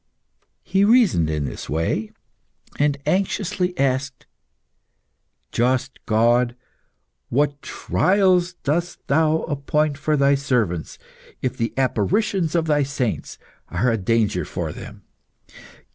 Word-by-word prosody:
He 195 +1 +2
reasoned 205 - +4
in 75 -2 -1
this - - -7
way, 80 +8 -1 0.7
and 145 -1 +2
anxiously 190 -1 0
asked 135 0 -1 1.3
"Just 130 +2 0
God, 120 +2 +3 0.7
what 145 +2 0
trials 185 -2 +2
dost 170 +5 -2
Thou 160 +2 +2
appoint 150 0 -1
for 155 +1 +1
Thy 140 0 +4
servants 120 - -1 0.5
if 130 - -1
the 115 - -2
apparitions 160 - +1
of 165 -1 +2
Thy 150 -2 +2
saints 135 -4 -2 0.3
are 115 +8 +1
a - - +1
danger 105 -3 +1
for - - -4
them? - - -11
140 Hz, 110 wpm, -22 LUFS, 115-165 Hz, 1.3 s, reasoned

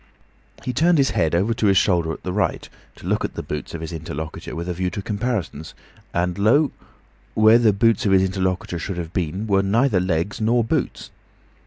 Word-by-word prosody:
He 125 - -3
turned 170 +4 +3
his 140 -1 +3
head 80 0 +1
over 100 +7 +2
his 95 -1 +4
shoulder 85 -4 +2
to - - -15
the 90 - -3
right, 105 - -1 0.3
to - - -14
look - - 0
at - - -4
the - - -4
boots 75 +2 -5
of 80 - -6
his 80 +1 -6
interlocutor 80 -1 -6
with 85 +1 -4
a 90 - -1
view 90 +1 -1
to 90 - -6
comparisons, 100 - -3 0.4
and 90 +1 -1
lo! 135 +8 +4 0.6
where 110 +2 +6
the 115 -3 +4
boots 105 +1 +2
of - - +2
his 95 -1 +5
interlocutor 95 -2 -2
should 95 +2 -4
have 85 -1 -5
been 90 +3 -2
were 100 -2 +2
neither 105 +2 +2
legs 90 +3 -1
nor 115 +2 +3
boots. 115 - -2
95 Hz, 200 wpm, -22 LUFS, 85-110 Hz, 0.6 s, where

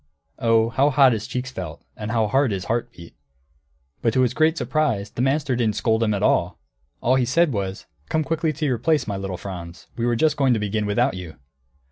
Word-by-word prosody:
Oh, 115 -1 +3
how 135 +5 +2
hot 135 -2 +5
his 110 -1 -4
cheeks 125 0 -4
felt, 85 -8 -7
and 105 -1 -6
how 115 -1 +1
hard 130 +5 +2
his 95 -3 -3
heart 120 +1 -1
beat! 85 -7 -13 0.9
But 115 - +1
to 130 - +4
his 125 -1 +2
great 155 +4 +2
surprise 115 -13 -1
the - - -4
master 135 0 +1
didn't 115 -3 0
scold 110 -1 +1
at 105 -3 0
all. - - +2 0.4
All 130 +2 +3
he 125 - +2
said 170 +4 +2
was, 95 -2 -4 0.2
"Come 160 0 +1
quickly 160 +1 0
to 155 +1 -3
your 125 -5 0
place, 150 +1 +1
my 100 - -3
little 95 -2 -4
Franz; 85 -3 -8
we 120 0 -1
were 120 - +2
just 155 +5 +2
going 135 -3 +3
to - - -1
begin 105 0 -1
without 120 +6 +1
you!" 90 -4 -8
120 Hz, 215 wpm, -23 LUFS, 105-135 Hz, 0.9 s, hot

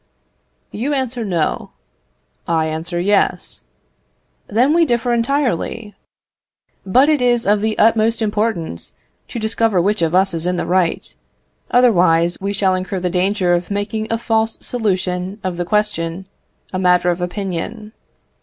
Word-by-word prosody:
You 275 +7 -2
answer, 255 -3 -2
No; 175 -7 -2 0.7
I 160 -1 +1
answer, 160 +2 -3
Yes. 200 +3 0 0.8
Then 245 +8 +2
we 340 0 +4
differ 240 -4 +1
entirely; 230 - -1 0.9
but 255 +9 +4
it 305 -3 +2
is 240 -1 +2
of 205 0 +2
the 220 0 -1
utmost 225 +1 +3
importance 210 - -2 0.3
to - - -7
discover 220 -2 +1
which 205 +3 +1
of 165 +1 +1
us 190 0 +3
is 165 +1 -1
in 180 - 0
the 175 - -2
right, 180 -2 0 0.5
otherwise 175 -8 +4
we 200 +1 -2
shall 195 -2 +1
incur 185 +1 -3
the 180 0 -2
danger 185 0 +1
of 175 0 -1
making 210 +2 -2
a 230 - +1
false 225 -1 0
solution 190 -4 -2
of 185 -2 -3
the 175 - -2
question, 190 -3 -1 0.5
a 185 - -1
matter 180 -1 +3
of 175 +1 -4
opinion. 200 +4 -4
200 Hz, 145 wpm, -18 LUFS, 180-225 Hz, 0.9 s, we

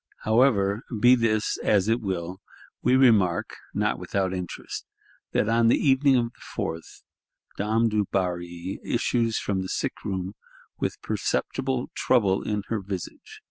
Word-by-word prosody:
However, 110 -3 +3 0.2
be 120 +4 +7
this 115 -3 +1
as 100 -2 +2
it 115 +2 +2
will, 95 -2 -4 0.4
we 130 - +3
remark, 110 -10 +3
not - - 0
without 95 -1 -1
interest, 90 -2 -6 0.4
that - - +1
"on 115 0 +3
the 115 - +5
evening 135 0 +4
of 120 -2 +3
the - - -26 0.2
4th," 80 0 -5 0.5
Dame 110 +3 +1
Dubarry 90 -4 -2
issues 115 -2 0
from 95 -2 -1
the 95 - -5
sick - - -3
room, 95 -1 -3 0.5
with - - -2
perceptible 130 -1 -1
"trouble 100 -7 +2
in 105 -1 -2
her 115 - 0
visage." 95 -2 -7
105 Hz, 140 wpm, -26 LUFS, 95-115 Hz, 0.5 s, be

